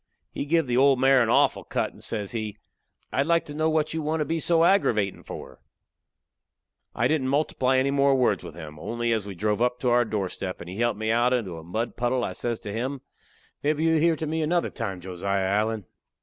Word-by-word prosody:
He - - -4
give 165 +1 +2
the 125 -1 0
old 135 0 +5
mare 135 0 +5
a 115 - +2
awful - - +3
cut - - -2
and - - -13
says 105 -3 -3
he: 110 -3 -4 0.6
"I'd 140 - +1
like 170 0 +2
to 145 - -8
know 155 +1 +1
what 155 -1 0
you 160 - -2
want 155 +1 -1
to - - +1
be 165 +1 -1
so 165 +1 +3
aggravatin' 115 - +2
for?" - - -9 1.4
I 120 - +2
didn't 140 -2 0
multiply 135 -2 +1
any 135 +1 +2
more 140 0 +3
words 130 -2 +2
with - - -9
him, 75 -2 -9
only 120 +6 -2
as 105 -3 -2
we 100 - -6
drove 105 +4 -1
up 125 0 +1
to 125 - +2
our 120 0 +5
doorstep, 100 -4 -3
and - - -9
he 95 +4 -7
helped 120 -2 +1
me 110 +1 -1
out 120 +2 +3
into 105 -9 -1
a - - -11
mud 110 +8 -3
puddle, 120 +1 0
I - - -2
says 120 -2 -3
to 105 - -6
him: 130 +4 -3 0.6
"Mebbe 150 +1 +1
you'll 160 0 +3
hear 165 +1 +3
to 160 - -4
me 160 +1 -1
another 170 +3 0
time, 95 -7 -4
Josiah 95 +2 -2
Allen." 105 +1 0
120 Hz, 225 wpm, -26 LUFS, 105-150 Hz, 1.4 s, old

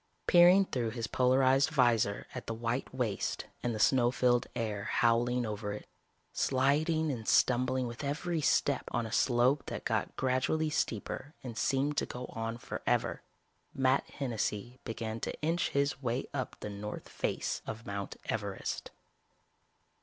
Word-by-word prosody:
Peering 180 +3 +7
through 120 -9 -1
his 115 0 -3
polarized 130 +4 +3
vizor 120 -8 +2
at - - -7
the 115 - -2
white 115 +3 -2
waste 120 -6 -2 0.2
and 120 -2 -1
the - - -4
snow 120 +1 +4
filled 125 -1 +2
air 105 -4 -2
howling 120 +1 +2
over 105 -1 -3
it, 105 - -7 0.5
sliding 150 +4 +2
and 115 -4 -5
stumbling 125 +1 +3
with 120 +3 -6
every 160 +4 -1
step - - +2
on 115 - -1
a 110 - -6
slope 125 +3 +3
that - - -5
got - - -1
gradually 135 +4 +1
steeper 135 +5 -2
and 120 -3 -6
seemed 140 +5 +1
to - - +1
go 125 +1 -6
on 115 +1 -3
forever, - - -1 0.5
Matt 130 0 +2
Hennessy 120 -2 -3
began 115 0 -4
to - - -4
inch 165 +3 +1
his 140 0 0
way 125 0 -1
up 130 -4 -3
the - - -4
north 105 +1 -6
face - - -2
of 110 +1 -6
Mount 100 -1 -4
Everest. 100 -3 -3
125 Hz, 150 wpm, -32 LUFS, 115-135 Hz, 0.5 s, Peering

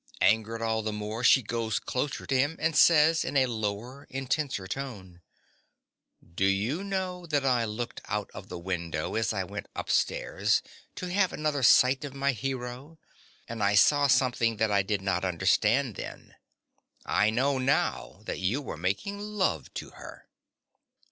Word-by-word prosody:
Angered 110 +1 +2
all 110 -1 0
the 110 0 -3
more, 105 +3 -5
she 130 +1 +6
goes 115 0 -2
closer 135 +3 -3
to 135 - -1
him, 145 +5 +2
and 160 -1 0
says, 160 0 +5
in 140 - -1
a 130 - +5
lower, 115 +3 -4
intenser 135 -5 -2
tone_) 95 -7 -7 1.1
Do 95 +2 +1
you 105 - 0
know 185 -3 -3
that 145 -3 0
I 125 -3 +2
looked 115 +2 -5
out 105 -1 -3
of 95 - -10
the 90 - -6
window 85 -3 -3
as 110 -2 0
I - - -1
went - - -7
upstairs, - - 0 0.3
to 180 -1 -5
have 190 0 +2
another 150 -2 -1
sight 130 +2 +5
of 140 -2 -7
my 140 0 +1
hero; 130 +4 -5 0.5
and 115 -1 -6
I 100 0 +3
saw 145 +7 +5
something 125 -4 +2
that 110 0 +1
I 100 -1 +4
did 95 0 -2
not 95 -1 0
understand 105 +7 +2
then. - - -8 0.7
I 105 +1 +2
know 130 +4 +1
now 130 +2 0
that - - -4
you 95 +9 0
were 140 - -6
making 100 - -2
love 205 - -2
to - - -6
her. - - -12
120 Hz, 160 wpm, -28 LUFS, 105-140 Hz, 1.1 s, she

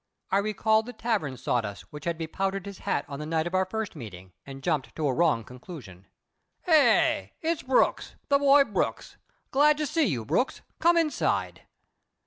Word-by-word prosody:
I 195 - +4
recalled 220 +2 +1
the 245 - -7
tavern 200 - -2
sawdust 100 -9 -2
which 150 - -8
had 170 -1 -1
bepowdered 190 +4 -3
his 200 -2 -8
hat 140 - -1
on 140 -1 -7
the 150 - -5
night 160 0 0
of 175 - -4
our 185 0 +2
first 220 +1 -4
meeting, 95 - -10
and 135 0 -9
jumped 155 -6 -1
to 155 -2 -1
a 135 - +1
wrong 155 -7 +2
conclusion. 125 - -11 0.6
"Eh? 305 - +4
It's 325 0 -1
Brooks 260 -1 +1
the 280 0 +4
boy 280 0 +6
Brooks! 210 -7 -3 0.3
Glad 295 +2 +4
to 305 - -1
see 310 +1 +1
you, 125 - -2
Brooks! 250 - 0 0.2
Come 340 +1 +4
inside." 320 -3 -1
190 Hz, 175 wpm, -27 LUFS, -, 0.6 s, boy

